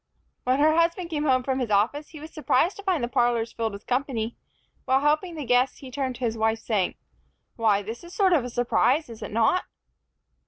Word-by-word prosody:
When 255 +1 +2
her 310 +2 +4
husband 335 +1 +1
came 300 -1 -1
home 255 -3 +3
from 265 0 -1
his 245 -3 -2
office, 225 +9 +1
he 310 - -11
was 310 +2 -10
surprised 315 +2 +1
to 405 - -9
find 365 -9 0
the - - +1
parlors 240 -1 +1
filled 225 -2 -2
with 200 - -9
company. 245 -3 -2 0.5
While 265 +1 +3
helping 305 +4 +1
the 300 -3 -5
guests, 250 +1 +2
he 265 -2 -11
turned 260 -1 -2
to 250 - -3
his 225 -1 -2
wife, 220 0 +2
saying, 210 -5 -1 0.6
"Why, 210 -3 +2
this 225 +4 -6
is 345 - -11
a - - -11
sort 380 -3 +3
of 250 -7 +1
surprise, 245 +4 +1
is 225 -2 -10
it - - -5
not?" 230 +12 +2
255 Hz, 220 wpm, -25 LUFS, 230-305 Hz, 0.6 s, her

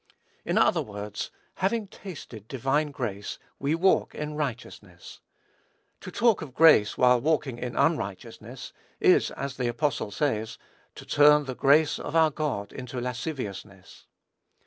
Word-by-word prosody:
In - - -1
other - - +4
words, 105 0 -6 0.3
having 210 +4 0
tasted 140 - -10
divine 135 +4 0
grace 105 -8 -5 0.2
we 140 +3 0
walk 190 +3 +2
in 150 0 -4
righteousness. 115 - -6 0.8
To - - -9
talk 230 -4 +2
of 140 -5 -9
grace, 155 -10 +5
while 125 -1 +4
walking 145 -4 0
in 120 -1 -5
unrighteousness, 100 - -2 0.3
is, - - +4
as 135 -1 -6
the 125 -2 -1
apostle 120 -1 -1
says, 110 -2 -2 0.4
to - - -11
turn 150 0 +5
"the 130 - -4
grace 145 +4 +3
of 145 - -6
our 160 -1 +5
God 140 -10 -3
into 125 -1 -6
lasciviousness." 115 - -6
135 Hz, 135 wpm, -27 LUFS, 110-150 Hz, 0.8 s, grace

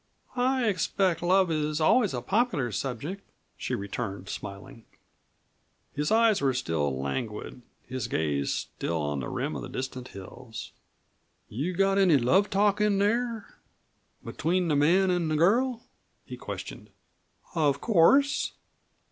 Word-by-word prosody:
"I 255 0 +1
expect 185 -2 +1
love 185 0 +3
is 155 -1 -1
always 205 +8 +3
a - - -4
popular 200 - 0
subject," 140 - -4 0.3
she - - -3
returned 100 -1 -5
smiling. 115 +5 -8 1.1
His 150 +1 -1
eyes 225 -4 +4
were 135 -2 +1
still 75 - -1
languid, 105 - -4 0.2
his 130 -2 -4
gaze 70 -3 -1
still 85 -1 -3
on 75 -2 -2
the 65 - -4
rim - - -3
of - - -6
distant 130 -1 -5
hills. 110 +5 -9 0.8
"You 150 +11 -3
got 195 +1 +3
any 180 -6 +5
love 175 +12 +3
talk 205 +1 +2
in 210 -1 +3
there 225 +2 -1 0.7
between 175 +2 0
the 150 - +2
man 180 +6 +4
an' 175 -2 0
the 155 - 0
girl?" 235 +9 +2 0.4
he - - -7
questioned. - - -8 0.6
"Of 145 -4 +2
course." 265 - +3
160 Hz, 130 wpm, -27 LUFS, 125-200 Hz, 1.1 s, any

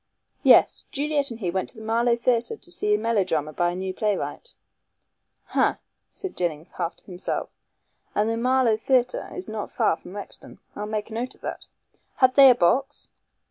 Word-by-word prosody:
"Yes. - - +5
Juliet 285 0 +1
and 230 -1 -8
he 180 -3 -1
went 190 +1 -2
to - - -10
the 220 - -9
Marlow 235 +2 +2
Theatre 240 - 0
to - - -13
see 420 0 +1
a - - +1
melodrama 185 - 0
by 175 +3 +1
a 175 - -4
new 185 0 -3
playwright." 210 - -3 1.0
"Ha!" - - +3 0.3
said 385 - -7
Jennings 165 -2 -3
half 170 - -3
to - - -19
himself, 180 -1 -4 0.6
"and 210 +1 +2
the 225 - 0
Marlow 250 -1 +2
Theatre 250 +2 +1
is 185 - -6
not 215 -1 -5
far - - +1
from 180 +3 -12
Rexton. 205 - -8 0.2
I'll 210 +1 -4
make 215 0 -3
a - - -6
note 245 +3 -4
of - - -27
that. - - -6 0.5
Had 255 -1 +4
they 275 0 +9
a 250 - +6
box?" 270 +9 +1
225 Hz, 185 wpm, -25 LUFS, 190-255 Hz, 1.0 s, they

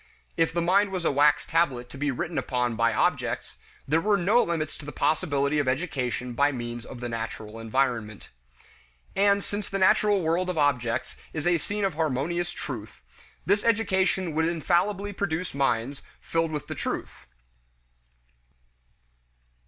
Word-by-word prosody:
If 165 -1 +2
the 170 0 0
mind 195 +3 +3
was 185 -3 -3
a - - +3
wax 145 +1 +4
tablet 140 -7 +1
to - - -9
be 145 0 0
written 165 +6 -2
upon 125 -2 -1
by 115 +1 +3
objects, 110 - -1 0.3
there 160 +4 +3
were 205 +1 +3
no 200 +7 +4
limits 160 -3 -2
to 145 - -10
the 150 - -6
possibility 145 -1 +1
of 145 - 0
education 130 -4 -1
by 140 +4 +3
means 120 -2 -5
of 120 - -9
the 120 - -3
natural 110 -1 -5
environment. 115 -2 -1 0.9
And 200 0 +3
since 205 0 -4
the 195 - -2
natural 195 0 +4
world 170 +3 +1
of 180 - -2
objects 125 -6 0 0.2
is 155 -2 -3
a 175 -1 +3
scene 205 +6 -2
of 195 - 0
harmonious 160 +3 -1
"truth," 110 - -7 0.4
this 200 +2 +2
education 190 -6 +1
would 160 +1 +2
infallibly 180 +5 +1
produce 180 -2 -2
minds 135 -1 0 0.2
filled 165 0 0
with 150 -2 -4
the - - -5
truth. - - -5
155 Hz, 155 wpm, -27 LUFS, 130-180 Hz, 0.9 s, wax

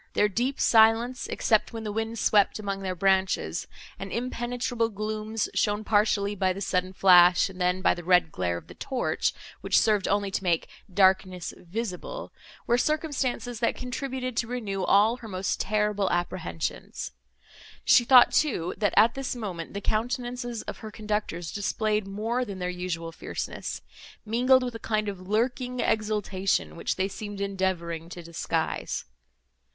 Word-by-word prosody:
Their 210 - +3
deep 245 +7 -1
silence, 230 +3 +4
except 220 -1 +1
when 225 -1 -5
the 210 - -3
wind 225 +2 -3
swept 205 -2 +3
among 200 -2 -4
their 185 -1 -3
branches, 190 +1 +1 0.3
and - - -6
impenetrable 240 -1 -2
glooms 215 +1 -3
shown 210 0 +1
partially 205 -1 +2
by 190 -2 +1
the 195 - -7
sudden 185 -1 -1
flash, 180 -1 +6
and 185 -1 -10
then, 180 +1 +1
by - - +5
the 175 - -8
red 180 -2 +4
glare 90 -1 -1
of - - -10
the - - -12
torch, - - -1 0.3
which - - +2
served 210 -3 +3
only 200 0 0
to 190 - -2
make 170 -3 +1 0.2
"darkness 185 -1 +2
visible," 220 - -6 0.3
were 240 +1 +2
circumstances, 265 -5 -1
that 235 - +1
contributed 255 0 -4
to 235 - 0
renew 210 -6 -3
all 215 +6 +4
her 240 -3 -10
most 190 -2 -2
terrible 210 -1 +1
apprehensions; 170 - -3 0.7
she 240 - +6
thought, 250 0 +7
too, 205 - +1
that, 205 -2 +1
at 225 +3 +6
this 270 -1 -3
moment, 190 -7 -6
the 200 - -3
countenances 240 +2 -2
of - - -6
her 220 - -7
conductors 210 -6 -3
displayed 210 0 -1
more 225 +5 -1
than 200 -5 -6
their 180 -1 -2
usual 175 -2 -4
fierceness, - - -5 0.4
mingled 250 +4 +4
with 245 -1 -3
a 225 - -7
kind 215 -1 -1
of 200 -2 -4
lurking 245 +4 -1
exultation, 210 -4 0
which - - -2
they 190 +1 0
seemed 205 0 -7
endeavouring 185 -4 -2
to 175 -1 -8
disguise. 170 0 -2
210 Hz, 155 wpm, -27 LUFS, 185-235 Hz, 0.7 s, thought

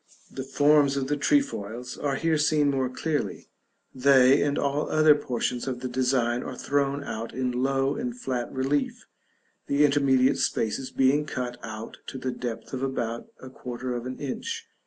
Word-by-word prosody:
The 130 - -5
forms 145 +1 +3
of 135 -1 -2
the 145 - +2
trefoils 125 - 0
are 140 -2 -1
here 160 +1 +1
seen 150 -1 +3
more 130 -2 0
clearly; 135 - -3 0.4
they, 130 0 +5
and 145 0 +1
all 140 +1 0
the - - -6
other 155 -1 +6
portions 125 -2 -2
of 125 -2 -3
the 130 - -2
design, 125 -1 +1
are 130 - -6
thrown 140 0 0
out 115 -4 -5
in 130 0 0
low 135 +2 +1
and 245 +1 -4
flat 125 - -3
relief, 135 +2 -1 0.6
the 145 +1 +4
intermediate 135 -2 +3
spaces 120 +4 -1
being 140 +3 +2
cut 125 -3 -4
out 110 0 -8
to - - -6
the 130 0 -3
depth 120 -1 -6
of 130 - -3
about 120 -4 -2
a 130 - -10
quarter 125 0 -5
of 120 +1 -4
an 130 - -5
inch. 455 - -4
135 Hz, 175 wpm, -26 LUFS, 125-145 Hz, 0.6 s, other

